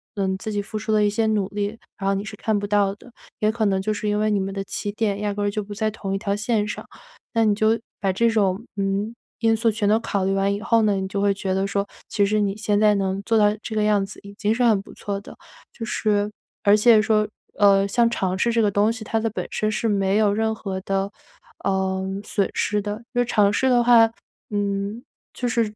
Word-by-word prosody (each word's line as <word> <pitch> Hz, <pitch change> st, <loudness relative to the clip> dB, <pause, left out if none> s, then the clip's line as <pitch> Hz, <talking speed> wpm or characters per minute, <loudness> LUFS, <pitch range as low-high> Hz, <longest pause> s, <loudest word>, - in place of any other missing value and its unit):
嗯， 190 Hz, -2 st, -1 dB
自 220 Hz, +2 st, -5 dB
己 205 Hz, -1 st, -1 dB
付 215 Hz, +2 st, -6 dB
出 220 Hz, +1 st, -3 dB
了 210 Hz, -1 st, +4 dB
一 205 Hz, -, +3 dB
些 220 Hz, +2 st, 0 dB
努 210 Hz, -3 st, +1 dB
力， 205 Hz, +2 st, -3 dB, 0.2 s
然 195 Hz, -, -3 dB
后 -, -, +2 dB
你 195 Hz, -, -2 dB
是 -, -, -7 dB
看 220 Hz, -2 st, 0 dB
不 205 Hz, -, -4 dB
到 200 Hz, -1 st, +2 dB
的， 245 Hz, +4 st, -17 dB, 0.3 s
也 215 Hz, 0 st, +2 dB
可 220 Hz, -1 st, -1 dB
能 190 Hz, -2 st, +1 dB
就 215 Hz, +3 st, -1 dB
是 210 Hz, -, -4 dB
因 210 Hz, -, +1 dB
为 215 Hz, 0 st, +2 dB
你 205 Hz, -, +2 dB
们 195 Hz, 0 st, -3 dB
的 195 Hz, 0 st, -3 dB
起 205 Hz, +1 st, -4 dB
点 205 Hz, -1 st, -1 dB
压 205 Hz, -1 st, -1 dB
根 205 Hz, -, -3 dB
儿 205 Hz, -, +2 dB
就 210 Hz, +1 st, -3 dB
不 205 Hz, +1 st, -8 dB
在 220 Hz, +1 st, 0 dB
同 195 Hz, -2 st, -5 dB
一 -, -, 0 dB
条 200 Hz, -1 st, -1 dB
线 210 Hz, 0 st, 0 dB
上。 -, -, -6 dB, 0.5 s
那 230 Hz, -, +3 dB
你 210 Hz, -1 st, +3 dB
就 220 Hz, +2 st, +2 dB, 0.2 s
把 195 Hz, -1 st, +1 dB
这 230 Hz, +5 st, +3 dB
种， 205 Hz, -1 st, +1 dB
嗯， 200 Hz, +3 st, -1 dB, 0.2 s
因 225 Hz, -1 st, +3 dB
素 225 Hz, 0 st, +2 dB
全 205 Hz, -1 st, 0 dB
都 220 Hz, +2 st, +4 dB
考 200 Hz, -4 st, -1 dB
虑 195 Hz, -, +1 dB
完 195 Hz, +1 st, +1 dB
以 205 Hz, -, -4 dB
后 230 Hz, -1 st, +3 dB
呢， 205 Hz, -2 st, +3 dB
你 190 Hz, -, -2 dB
就 200 Hz, +1 st, -3 dB
会 200 Hz, -1 st, +3 dB
觉 190 Hz, -1 st, -2 dB
得 190 Hz, +1 st, +1 dB
说 200 Hz, 0 st, -1 dB, 0.2 s
其 205 Hz, -, +1 dB
实 210 Hz, +1 st, +1 dB
你 200 Hz, -1 st, 0 dB
现 205 Hz, -1 st, +1 dB
在 210 Hz, 0 st, +5 dB
能 195 Hz, 0 st, -1 dB
做 225 Hz, +1 st, +2 dB
到 210 Hz, -1 st, +5 dB, 0.2 s
这 220 Hz, -, -5 dB
个 215 Hz, -, +2 dB
样 210 Hz, -2 st, +2 dB
子 195 Hz, -, -9 dB
已 200 Hz, 0 st, -11 dB
经 215 Hz, 0 st, +1 dB
是 245 Hz, -, +1 dB
很 220 Hz, -4 st, +4 dB
不 -, -, -14 dB
错 200 Hz, -1 st, -4 dB
的。 -, -, -12 dB, 0.4 s
就 230 Hz, -, -8 dB
是， 210 Hz, -2 st, 0 dB, 0.3 s
而 205 Hz, 0 st, +6 dB
且 220 Hz, 0 st, +6 dB
说， 215 Hz, -1 st, +2 dB, 0.3 s
呃， 200 Hz, -1 st, +5 dB
像 235 Hz, +3 st, +3 dB
尝 190 Hz, -5 st, -1 dB
试 235 Hz, +5 st, +2 dB
这 230 Hz, -, +3 dB
个 205 Hz, -1 st, +2 dB
东 205 Hz, +3 st, +3 dB
西， 225 Hz, -1 st, -7 dB
它 225 Hz, +1 st, -1 dB
的 225 Hz, +1 st, 0 dB
本 -, -, -4 dB
身 215 Hz, 0 st, 0 dB
是 225 Hz, -, -1 dB
没 195 Hz, -1 st, +1 dB
有 210 Hz, -2 st, +3 dB
任 220 Hz, +1 st, 0 dB
何 195 Hz, -3 st, -4 dB
的， 195 Hz, +1 st, -1 dB, 0.5 s
嗯， 190 Hz, 0 st, -1 dB
损 200 Hz, -1 st, 0 dB
失 210 Hz, 0 st, 0 dB
的， 210 Hz, +2 st, -5 dB
就 245 Hz, -1 st, +2 dB
尝 210 Hz, -4 st, +3 dB
试 265 Hz, +5 st, +2 dB
的 245 Hz, -1 st, +4 dB
话 230 Hz, -2 st, +6 dB, 0.4 s
嗯， 200 Hz, +2 st, -2 dB, 0.3 s
就 250 Hz, -, -2 dB
是， 235 Hz, 0 st, +1 dB
205 Hz, 275 characters per minute, -23 LUFS, 200-220 Hz, 0.5 s, 而